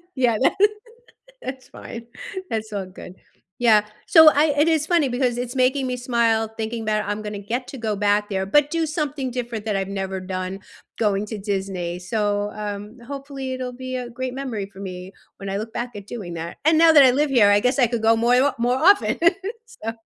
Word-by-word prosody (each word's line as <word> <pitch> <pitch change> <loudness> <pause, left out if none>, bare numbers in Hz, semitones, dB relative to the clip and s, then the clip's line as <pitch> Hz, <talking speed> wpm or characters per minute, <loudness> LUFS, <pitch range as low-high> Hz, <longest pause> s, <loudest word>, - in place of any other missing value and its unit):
Yeah, 240 -4 +2
that - - +4 0.9
that's 260 0 -7
fine, 230 0 -9 0.4
that's 220 -1 -3
all 200 -2 -3
good. 185 0 -11 0.4
Yeah, 220 -3 +5 0.2
so 320 -2 +8
I 295 0 +2
it 300 +3 +4
is 315 -2 +2
funny 335 -5 +2
because 245 -1 0
it's 245 +1 -4
making 260 +1 +2
me 250 -1 -2
smile 235 -3 +1
thinking 225 0 -4
'bout 215 0 0
I'm 205 +1 -3
gonna 210 -1 -5
get 235 +6 -4
to 270 - -8
go 215 -2 -2
back 205 0 +1
there, 190 -2 -1
but 295 +7 +3
do 330 -1 0
something 295 -4 -3
different 240 -3 -4
that 210 -3 -1
I've 195 0 -2
never 190 -1 -4
done- 185 +1 -5 0.4
going 205 -2 +1
to 215 0 -6
Disney. 190 -3 -3
So, 205 +2 -1
um 210 +2 -6
hopefully, 275 -1 -6
it'll 255 -1 -4
be 255 +1 -5
a 250 -1 -5
great 255 +1 -5
memory 245 -7 -4
for 195 - -12
me 185 -1 -7 0.3
when 195 -1 -7
I 195 - -2
look 220 +2 -5
back 240 +2 -3
at 200 0 -9
doing 195 -8 -7
that. 165 +1 -6
And 315 +1 +4
now 330 0 +7
that 295 -3 +8
I 260 - +7
live 295 +2 +1
here, 225 -6 +5
I 205 0 +5
guess 250 +4 +1
I 250 - +5
could 235 -1 -3
go 225 +1 +5
moi 240 +2 +3
wa 285 - +2
more 245 +2 +1
often, 395 +8 +4 0.5
so 465 - -6
230 Hz, 210 wpm, -22 LUFS, 205-260 Hz, 0.9 s, so